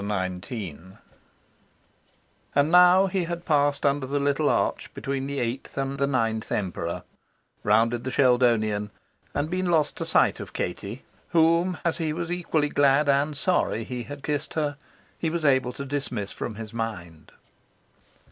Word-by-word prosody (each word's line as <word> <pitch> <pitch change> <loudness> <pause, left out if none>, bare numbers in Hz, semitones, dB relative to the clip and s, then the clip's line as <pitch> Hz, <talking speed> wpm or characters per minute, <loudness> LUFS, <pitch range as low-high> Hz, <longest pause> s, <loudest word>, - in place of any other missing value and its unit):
XIX 95 - -4 1.8
And 145 +3 +3
now 180 +2 +7
he 190 -2 -1
had 170 0 -5
passed 145 -1 +2
under 140 -1 +1
the 145 +2 0
little 145 +1 +1
arch - - 0
between 135 0 -3
the 140 0 -3
eighth 120 +4 -4
and 135 0 -2
the 140 - +2
ninth 115 -5 -1
Emperor, 90 -4 -2 0.6
rounded 115 +3 +2
the 130 - -3
Sheldonian, 115 -6 +2 0.5
and 145 +1 0
been 185 +2 -1
lost 160 -4 +2
to - - -3
sight - - +3
of - - -8
Katie, 100 +7 -4 0.3
whom, 170 +2 +3
as 170 - 0
he 160 -2 -1
was 170 +1 -4
equally 165 -4 0
glad 145 +1 +3
and 140 +1 +2
sorry 145 - +1
he 125 +2 -5
had 140 +3 -8
kissed 150 0 -3
her, 150 -2 0 0.4
he 165 - 0
was 165 -1 -2
able 130 -3 +3
to 140 - -6
dismiss 130 -7 -3
from 110 - -5
his 110 0 -8
mind. 90 -9 -5
140 Hz, 155 wpm, -26 LUFS, 115-155 Hz, 1.8 s, now